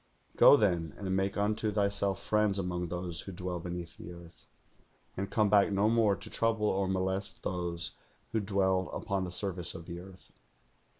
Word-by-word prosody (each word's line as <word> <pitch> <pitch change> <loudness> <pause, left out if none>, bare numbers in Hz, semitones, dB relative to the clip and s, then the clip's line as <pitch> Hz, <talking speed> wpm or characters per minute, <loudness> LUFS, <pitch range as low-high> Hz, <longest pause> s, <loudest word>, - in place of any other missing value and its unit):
Go, 145 - +8
then, 85 - 0
and 95 -2 -2
make 95 +1 -1
unto 105 +1 0
thyself 100 -2 0
friends 105 -2 +2
among 90 -2 -2
those 90 0 -3
who 95 - -8
dwell 90 -1 -4
beneath 85 -1 -6
the 90 - -8
earth, 85 -1 -14 0.7
and 100 +1 -3
come 110 -2 +2
back 100 0 +4
no 100 +2 +2
more 110 -4 +3
to - - -9
trouble 115 -2 +1
or 95 0 0
molest 95 +1 -2
those 85 -2 -2 0.4
who 110 - +1
dwell 95 -2 +1
upon 95 -1 -2
the 90 - -6
surface 90 -2 +2
of 85 - -8
the 85 0 -7
earth.' 95 +1 -14
95 Hz, 175 wpm, -31 LUFS, 90-100 Hz, 0.7 s, Go